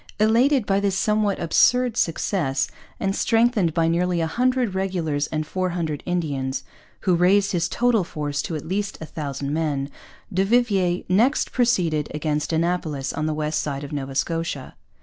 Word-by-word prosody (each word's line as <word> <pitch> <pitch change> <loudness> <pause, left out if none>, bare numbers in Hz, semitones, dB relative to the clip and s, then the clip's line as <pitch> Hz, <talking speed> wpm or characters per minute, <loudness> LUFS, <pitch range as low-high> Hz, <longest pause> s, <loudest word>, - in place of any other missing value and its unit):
Elated 235 +4 +4
by 195 0 +2
this 200 -1 0
somewhat 210 -1 +1
absurd 245 +8 +3
success, 160 - 0 0.3
and 195 0 0
strengthened 225 -6 +2
by 165 -1 +2
nearly 175 +1 +1
a 165 - +1
hundred 250 +4 +1
regulars 170 -7 -1
and 155 -1 -2
four 185 +3 -2
hundred 165 -4 -3
Indians, 145 -7 -2 0.4
who 185 - +2
raised 190 +3 +3
his 175 -2 0
total 240 -4 +2
force 145 -3 -3
to 165 - -4
at 150 - -5
least 200 +3 -2
a 160 - -6
thousand 140 -2 -4
men, 145 -3 -1 0.4
du 190 +2 +2
Vivier 195 -5 +2
next 230 +11 +2
proceeded 180 - +1
against 150 0 -1
Annapolis 160 -4 -1
on 155 +1 -2
the 155 - 0
west 155 0 -1
side 140 -1 -4
of 145 - -7
Nova 135 -2 -4
Scotia. 165 -1 -2
175 Hz, 165 wpm, -23 LUFS, 150-200 Hz, 0.4 s, Elated